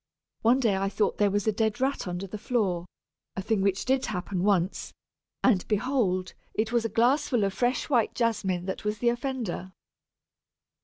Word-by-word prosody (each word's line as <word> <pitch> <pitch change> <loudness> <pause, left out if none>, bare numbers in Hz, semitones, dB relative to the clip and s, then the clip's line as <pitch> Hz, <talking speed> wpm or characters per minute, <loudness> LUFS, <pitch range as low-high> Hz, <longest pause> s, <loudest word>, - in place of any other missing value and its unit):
One 240 +4 +4
day 225 -6 +2
I 195 +1 0
thought 205 +1 0
there 205 -1 +4
was 205 0 0
a 220 - +3
dead 220 0 0
rat 265 -4 0
under 180 +2 -3
the 205 +2 -7
floor 190 -8 0 0.5
(a 190 - -2
thing 215 0 +1
which 195 0 +1
did 260 0 +1
happen 180 -2 -3
once), 190 -2 +1 0.5
and 205 -8 +4
behold, 210 -5 0 0.2
it 220 +1 0
was 235 -1 +2
a 225 - -1
glassful 245 0 +2
of 195 -1 0
fresh 245 +4 0
white 240 -7 +2
Jasmine 195 -7 0
that 190 - -4
was 210 0 -1
the 235 +3 +2
offender!" 235 -7 -3
210 Hz, 175 wpm, -27 LUFS, 190-240 Hz, 0.5 s, One